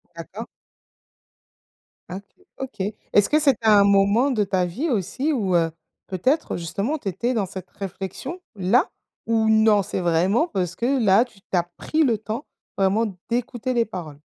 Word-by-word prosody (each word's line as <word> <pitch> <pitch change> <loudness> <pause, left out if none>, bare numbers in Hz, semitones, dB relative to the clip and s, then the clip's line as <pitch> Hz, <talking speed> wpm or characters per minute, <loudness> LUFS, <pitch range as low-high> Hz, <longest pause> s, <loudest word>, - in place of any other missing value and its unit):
D'accord. 200 +7 -8 1.6
Ah 180 - -5
OK, - - -8 0.6
OK. 205 +2 -2 0.2
Est-ce 205 - +5
que 305 - +4
c'était 270 -7 +2
un 205 -2 +7
moment 200 +7 +4
de 215 -5 +1
ta 185 -2 0
vie 245 - -3
aussi 255 - -1
où, 200 - 0
heu, 165 -1 +2 0.4
peut-être, 255 - 0
justement 200 - -2
tu 240 - -9
étais 235 +7 -1
dans 205 -4 +1
cette 185 0 -9
réflexion 200 - -6
là, 210 - +2 0.4
ou 225 -1 +2
non 220 -2 +4
c'est - - -3
vraiment 180 - +2
parce 180 - -2
que 250 +3 0
là, 195 +3 +6
tu 220 -5 -21
as 175 -2 +3
pris 315 - 0
le 235 -6 +2
temps 220 +6 -5 0.3
vraiment 195 +4 +2 0.2
d'écouter 245 +1 -2
les 235 -2 +2
paroles? 165 -9 -8
210 Hz, 165 wpm, -23 LUFS, 190-245 Hz, 1.6 s, un